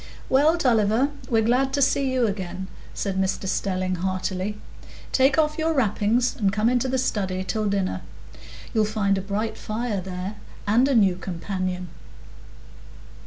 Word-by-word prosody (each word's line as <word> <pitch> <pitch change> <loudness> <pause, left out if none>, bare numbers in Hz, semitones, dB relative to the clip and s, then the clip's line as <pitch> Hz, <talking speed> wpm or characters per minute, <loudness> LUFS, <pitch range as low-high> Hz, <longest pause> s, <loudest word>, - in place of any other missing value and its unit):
"Well, 300 +5 +4
Tulliver, 235 -2 +3 0.2
we're 225 -3 +3
glad 255 +4 +2
to 285 - +1
see 275 0 +2
you 255 -2 +2
again," 190 -3 -3 0.3
said 190 -1 -2
Mr 190 0 -1
Stelling, 185 -1 -1
heartily. 185 +2 -2 0.5
"Take 265 +3 +4
off 305 0 +2
your 320 0 +1
wrappings 230 0 +2
and 200 -4 +1
come 215 +3 +2
into 250 +1 +1
the 260 0 0
study 190 -7 -1
till 215 +3 -1
dinner. 195 - -1 0.7
You'll 220 -1 +3
find 205 -2 +1
a - - -3
bright 210 +3 -3
fire 215 -2 -2
there, 185 +2 -5 0.3
and 230 +6 +4
a 275 - +2
new 195 -5 +4
companion." 185 0 -4
210 Hz, 150 wpm, -24 LUFS, 190-250 Hz, 0.7 s, Well